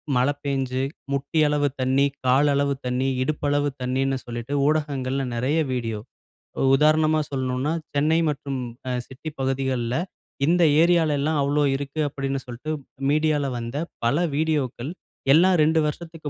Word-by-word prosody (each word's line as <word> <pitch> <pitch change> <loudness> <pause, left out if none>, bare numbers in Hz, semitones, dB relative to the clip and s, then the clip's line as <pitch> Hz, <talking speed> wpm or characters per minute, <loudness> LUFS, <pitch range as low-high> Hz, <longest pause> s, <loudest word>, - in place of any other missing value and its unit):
மழை 130 +3 +3
பேஞ்சு, 135 -2 -1 0.3
முட்டி 140 +3 -1
அளவு 145 -1 +2
தண்ணீ, 130 +2 +3 0.2
கால் 135 +3 +4
அளவு 140 0 +1
தண்ணீ, 125 +1 0
இடுப்பளவு 145 0 0
தண்ணீன்னு 135 +1 0
சொல்லிட்டு, 120 +3 -5
ஊடகங்கள்ல 140 -3 0
நிறைய 135 +7 +1
வீடியோ. 115 -4 -2 0.6
ஒ - - 0
உதாரணமா 155 +2 +3
சொல்லனும்னா, 130 +2 -1 0.2
"சென்னை 155 +3 +3
மற்றும் 140 -2 -3 0.3
அ - - -1 0.2
சிட்டி 135 +4 -7
பகுதிகள்ல 130 -2 -1 0.5
இந்த 175 +2 +3 0.2
ஏரியாலெல்லாம் 160 -3 +2
அவ்வளோ 145 +1 +2
இருக்கு!" 140 +2 -5
அப்படின்னு 135 -1 -3
சொல்லிட்டு, 125 +5 -6 0.4
மீடியால 150 -1 +2
வந்த 120 +4 -5 0.3
பல 130 +6 +2 0.2
வீடியோக்கள், 145 -3 -1 0.4
எல்லாம் 180 +4 +5
2 160 +1 +3
வருஷத்துக்கு 160 0 -5
140 Hz, 130 wpm, -24 LUFS, 130-155 Hz, 0.6 s, எல்லாம்